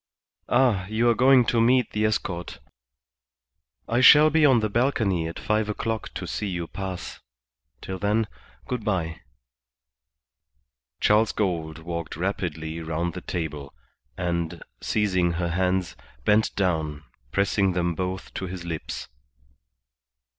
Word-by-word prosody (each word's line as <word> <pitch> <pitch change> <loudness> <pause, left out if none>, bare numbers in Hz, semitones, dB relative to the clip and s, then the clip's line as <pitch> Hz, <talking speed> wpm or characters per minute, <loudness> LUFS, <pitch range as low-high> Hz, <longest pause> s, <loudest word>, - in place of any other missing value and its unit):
"Ah, 120 -7 +3
you 110 +3 +1
are 120 - +5
going 130 +1 +5
to 115 0 +2
meet 125 +1 +3
the 105 0 0
escort. 90 -5 -2 1.3
I 120 +2 +1
shall 150 +3 +8
be 155 -1 +5
on 130 -4 +5
the 110 - 0
balcony 105 -7 +1
at 85 - -6
five 110 0 0
o'clock 110 +1 -3
to - - -4
see 105 - -3
you 90 -3 -3
pass. 95 0 -6 0.6
Till 95 0 -5
then, 105 +3 +1 0.4
good 125 -3 -3
bye." 85 -6 -2 1.8
Charles 110 +1 +4
Gould 85 -6 -2
walked 85 -1 -5
rapidly 85 -3 -3
round 80 +2 -2
the - - -6
table, 75 -6 -5 0.4
and, 85 -2 -2 0.2
seizing 95 -5 +1
her 85 0 -1
hands, 90 +1 0 0.3
bent 105 +1 +3
down, 80 -6 -1 0.3
pressing 100 -1 +2
them 85 -1 0
both 95 +2 -4
to 95 - -4
his 90 -1 -7
lips. 80 -2 -5
95 Hz, 130 wpm, -25 LUFS, 85-110 Hz, 1.8 s, shall